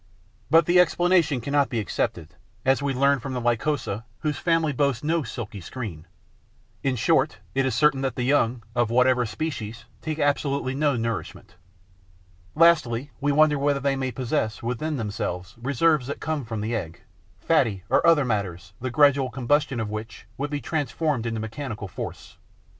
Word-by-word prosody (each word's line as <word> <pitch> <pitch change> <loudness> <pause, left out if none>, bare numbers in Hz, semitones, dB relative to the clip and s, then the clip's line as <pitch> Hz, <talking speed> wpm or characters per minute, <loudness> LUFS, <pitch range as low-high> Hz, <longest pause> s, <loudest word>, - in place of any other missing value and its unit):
But 165 0 +6
the 175 +2 +4
explanation 175 -5 +3
cannot 140 +3 +1
be 120 - -2
accepted, 105 - -2 0.4
as 135 +1 +3
we 140 -1 0
learn 140 +1 +3
from 130 +1 -5
the 125 - -2
Lycosa, 120 -2 -1 0.2
whose 150 -2 -1
family 165 -3 +1
boasts 140 -3 0
no 165 +2 +1
silky 110 -5 -6
screen. 90 -6 -7 0.7
In 135 -2 0
short, 145 +4 +2 0.2
it 135 0 +1
is 125 - -1
certain 135 +1 +3
that 135 -3 -1
the 125 - -2
young, 125 -3 +2
of 120 -2 +1
whatever 125 0 +3
species, 115 -4 -5 0.2
take 155 -1 -3
absolutely 140 -2 0
no 145 0 +1
nourishment. 115 -2 -4 1.0
Lastly, 150 -6 +3
we 145 +1 +2
wonder 150 0 +4
whether 140 0 +1
they 140 0 +1
may 130 -1 -2
possess 115 -4 -2
within 140 +6 -2
themselves 100 -4 -4
reserves 140 +1 +2
that 140 - -4
come 155 -4 -2
from 110 -2 -4
the 115 +3 -2
egg, 85 -6 -5 0.4
fatty 100 -4 +1
or - - +3
other 165 -4 +5
matters 95 -6 -3
the 130 - -2
gradual 140 0 +4
combustion 135 +2 0
of 110 -2 -3
which 110 +1 -7
would 145 +2 -3
be 145 0 -2
transformed 145 -3 -1
into 115 -1 -2
mechanical 110 -1 -5
force. - - -8
130 Hz, 165 wpm, -25 LUFS, 115-145 Hz, 1.0 s, But